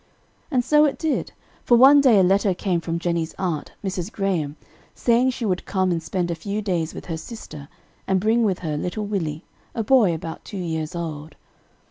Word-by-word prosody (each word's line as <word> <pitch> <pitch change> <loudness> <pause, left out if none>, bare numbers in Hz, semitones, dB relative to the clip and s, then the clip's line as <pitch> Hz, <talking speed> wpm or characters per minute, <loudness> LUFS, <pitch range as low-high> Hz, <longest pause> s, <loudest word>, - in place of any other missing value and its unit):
And 250 -5 +1
so 300 +2 +5
it 285 - 0
did; 320 -3 -1 0.3
for 240 - +5
one 275 +4 +8
day 250 -6 +5
a - - +5
letter 195 +1 +3
came 175 -2 -1
from 165 0 -2
Jennie's 170 -1 -2
aunt, 170 -6 -3
Mrs. 190 0 -3
Graham, 180 -9 -1 0.4
saying 245 +2 +3
she 255 -2 -3
would 185 -3 -1
come 185 -2 +1
and 170 -1 -1
spend 175 +2 -2
a 165 -1 -5
few 200 +3 -2
days 175 -6 -2
with - - -8
her 165 -2 -4
sister, 155 - -9 0.4
and 190 -1 +2
bring 225 +4 +2
with 195 -5 +1
her 150 -2 -1
little 195 +7 -3
Willie, 165 -6 -3 0.3
a 225 - -1
boy 225 -5 +4
about 160 0 -7
two 205 - -8
years 160 -2 -3
old. 155 -3 -6
185 Hz, 195 wpm, -23 LUFS, 165-220 Hz, 0.4 s, one